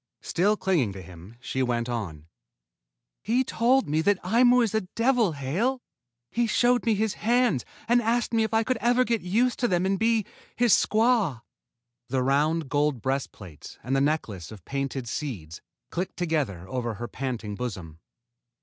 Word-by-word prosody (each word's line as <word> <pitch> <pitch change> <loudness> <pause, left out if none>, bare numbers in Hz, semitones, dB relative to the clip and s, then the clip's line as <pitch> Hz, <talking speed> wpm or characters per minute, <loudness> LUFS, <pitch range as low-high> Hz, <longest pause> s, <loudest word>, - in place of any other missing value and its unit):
Still 205 +5 +1
clinging 155 - +1
to 95 - -8
him, 90 +5 -13
she 130 +1 -3
went 120 -2 0
on. 95 -11 -5 1.0
"He 245 +4 +1
told 255 +2 +2
me 155 +2 +1
that 200 +3 +2
Aimu 245 +5 +4
is 220 - -1
a 220 - +2
devil, 230 0 +1
Hale. 180 - -1 0.5
He 235 0 +1
showed 245 +2 +2
me 225 - +4
his 215 0 0
hands 235 - +2 0.2
and 240 +1 +4
asked 235 +1 0
me 225 -1 +3
if 220 - -2
I 225 0 +2
could 255 +2 -1
ever 245 +2 +3
get 235 -3 0
used 230 +8 +1
to 245 - +2
them 180 -2 +1
and 195 0 0
be 225 -2 +2 0.3
his 240 -4 +4
squaw." 215 - +2 0.7
The 130 -1 0
round 150 +4 +1
gold 145 -1 +1
breastplates 120 - -5
and 130 +3 -1
the 135 - +2
necklace 115 - -2
of 100 -6 -12
painted 135 -2 -3
seeds 100 - -5 0.3
clinked 180 +2 -4
together 150 - -1
over 120 -1 -3
her 120 +3 -5
panting 120 -6 -4
bosom. 95 -9 -6
165 Hz, 170 wpm, -26 LUFS, -, 1.0 s, Aimu